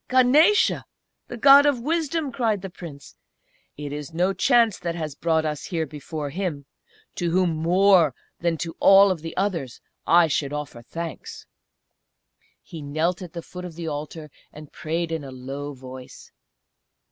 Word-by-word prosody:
"Ganesa! 285 - +4 0.4
the 245 - -7
God 280 +4 +7
of 280 -4 +2
Wisdom!" 315 +1 -1
cried 220 -5 -1
the 195 - -6
Prince. 155 -6 -11 0.6
"It 145 -1 -6
is 150 +2 -7
no 180 +3 +1
chance 235 -3 +3
that 170 -1 -3
has 155 -4 -4
brought 160 +1 0
us 150 -1 -3
here 165 -3 -2
before 150 0 -6
Him, 165 -5 -4 0.5
to 175 -2 -2
whom 180 0 +2
more 170 -1 +3 0.2
than 170 -1 0
to 165 +1 -5
all 195 0 +7
the 165 -1 -8
others 170 - -2 0.3
I 170 0 +6
should 145 -2 -1
offer 150 -5 -6
thanks!" 165 +7 -7 1.2
He 165 - -9
knelt 155 +5 -1
at 175 -3 -9
the 170 -2 -6
foot 180 0 -9
of 175 -3 -8
the 170 -1 -6
altar 150 0 -6 0.2
and 150 -1 -13
prayed 165 +2 -3
in 160 -2 -3
a 135 - -8
low 135 +3 -7
voice. 130 0 -11
165 Hz, 160 wpm, -24 LUFS, 150-195 Hz, 1.2 s, God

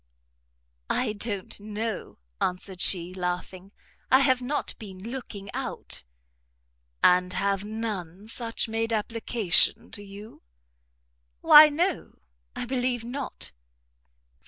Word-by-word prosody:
"I 245 -4 +1
don't 205 -2 -3
know," 215 +1 -4 0.2
answered 185 0 -2
she, 180 -1 0
laughing, 180 +1 -4 0.4
"I 260 - +6
have 260 -2 +3
not 280 +4 -2
been 200 0 -8
looking 205 -7 -7
out." - - -4 1.0
"And 180 0 +5
have 200 +1 0
none 210 -3 -5
such 230 0 -2
made 225 +1 -1
application 225 -3 +2
to 205 - -6
you?" 205 +2 -11 1.0
"Why 300 0 +10
no, 340 +4 -1 0.4
I - - -3
believe 245 -1 -1
not." 260 +3 -5
215 Hz, 105 wpm, -27 LUFS, 190-240 Hz, 1.0 s, Why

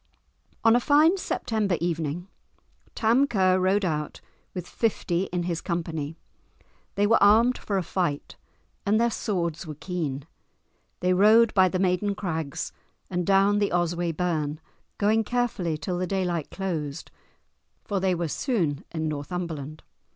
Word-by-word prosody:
On 225 0 +6
a - - +5
fine 300 +7 +5
September 215 - -1
evening 165 0 -2 0.7
Tam 235 +5 +3
Ker 185 -6 +3
rode 190 +2 +2
out, 150 -3 -2 0.4
with 180 -2 -4
fifty 195 -5 0
in 180 -2 -3
his 170 -2 -2
company. 165 -3 -3 0.8
They 205 - +2
were 225 +2 +4
armed 225 +5 +6
for 200 - -2
a 190 - 0
fight 170 -6 -2 0.5
and 215 +1 +2
their 235 0 +2
swords 170 -6 -2
were 155 - -6
keen; 150 -5 -4 0.8
they 180 +1 +3
rode 215 +4 +5
by 190 -2 +5
the 185 - -1
Maiden 190 +2 +1
Crags 160 -8 -4 0.4
and 180 -1 -1
down 200 +1 +4
the 205 - +1
Osway 175 0 0
burn, 155 -3 -2 0.4
going 215 +2 +2
carefully 220 -9 -1
till 175 +4 -3
the 185 - -1
daylight 180 -4 -1
closed, 165 -6 -4 0.7
for 200 -2 -1
they 185 -1 +1
were 170 -1 -2
soon 165 - -1
in 160 -1 -3
Northumberland. 155 0 -5
180 Hz, 145 wpm, -26 LUFS, 165-205 Hz, 0.8 s, On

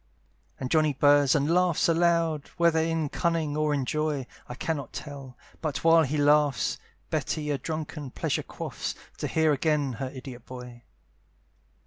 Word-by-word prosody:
And 130 -1 -4
Johnny 155 -2 +3
burrs 145 0 +4
and 150 +3 +2
laughs 180 -2 +3
aloud, 165 -3 +2
Whether 170 -2 +4
in 160 -1 0
cunning 165 -1 -1
or 155 0 +1
in 140 -3 0
joy, 150 -1 -1 0.2
I 125 - -5
cannot 145 0 -3
tell; 140 -4 -8 0.2
but 155 -3 -3
while 165 0 +6
he 150 0 0
laughs, 145 -1 +3 0.3
Betty 150 -1 -1
a 140 - -1
drunken 155 -1 -5
pleasure - - -1
quaffs, - - -5 0.2
To - - -1
hear 160 -1 +2
again 145 -2 +1
her 135 -2 -2
idiot 130 -2 -9
boy. 125 -2 -10
150 Hz, 150 wpm, -27 LUFS, 140-160 Hz, 0.3 s, while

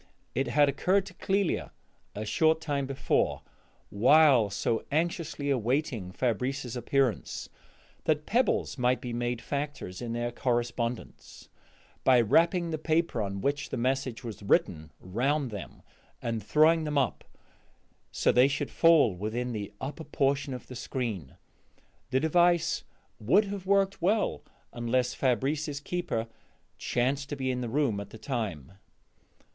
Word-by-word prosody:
It 135 - 0
had 145 0 +4
occurred 185 +8 +2
to 185 - -11
Clélia 195 +1 0 0.5
a 105 - -4
short 160 +8 +3
time 145 -4 -2
before, 135 0 0 0.5
while 130 0 +5
so 110 +3 -1
anxiously 155 -2 -1
awaiting 125 -5 -1
Fabrice's 125 +3 -2
appearance, 125 -2 -1 0.6
that 150 -1 +1
pebbles 240 - +1
might 125 +1 +2
be 120 -1 -5
made 120 0 -2
factors 140 -10 -4
in 120 -1 -4
their 120 0 -2
correspondence, 120 -1 -3 0.5
by 130 -2 +6
wrapping 170 - +3
the 155 - -2
paper 160 -6 0
on 100 -1 -3
which 145 +4 -1
the - - -3
message 130 0 -1
was 115 -3 -7
written 80 -5 +1
round 130 +8 -1
them 100 -3 -8 0.4
and 115 -1 -3
throwing 155 - +4
them 150 -1 -2
up 130 -5 0 0.9
so - - +2
they 125 +2 +5
should 135 -1 -2
fall 165 - +5
within 110 +7 -3
the 105 -3 -4
open 130 - -3
upper 155 +3 -7
portion 140 -3 0
of 125 - -9
the 130 - -10
screen. 115 - -4 0.7
The 130 0 +2
device 175 +2 +2 0.3
would 170 - +4
have 195 -2 -6
worked 195 -1 +2
well 205 +5 +1 0.3
unless 120 +1 0
Fabrice's 140 +4 0
keeper 145 -8 -2 0.5
chanced 135 +4 -1
to 145 - -3
be 130 -2 -1
in 125 0 -3
the 120 - -3
room 130 -5 +1
at 100 - -7
the - - -11
time. 100 - -4
130 Hz, 140 wpm, -29 LUFS, 115-155 Hz, 0.9 s, by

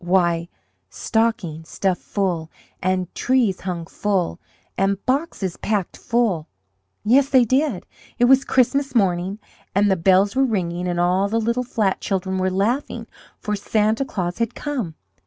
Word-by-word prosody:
Why, 170 -2 +2 0.4
stockings, 200 -9 -1
stuffed 190 -2 -1
full, 175 -5 -2 0.3
and 185 -1 -1
trees 245 -8 +1
hung 175 -3 -4
full, 185 -1 -1 0.4
and 195 +1 +1
boxes 255 - -1
packed 205 -4 -1
full! 220 -10 0 0.6
Yes, 270 +5 +4
they 260 -3 +5
did! 260 - +1 0.3
It 245 - +4
was 265 +2 +6
Christmas 270 +2 +1
morning, 190 -2 +1 0.4
and 205 0 +4
the - - +4
bells 190 +5 +3
were 270 - +4
ringing, 180 -7 -1
and 175 -1 -1
all 185 +3 +2
the 225 +2 +1
little 235 +3 0
flat 215 -5 0
children 190 -1 -1
were 185 0 +1
laughing, 210 +9 -1 0.3
for 210 - -2
Santa 215 +4 +1
Claus 180 -6 -3
had 230 0 -1
come! 245 - -3
200 Hz, 145 wpm, -22 LUFS, 180-235 Hz, 0.6 s, was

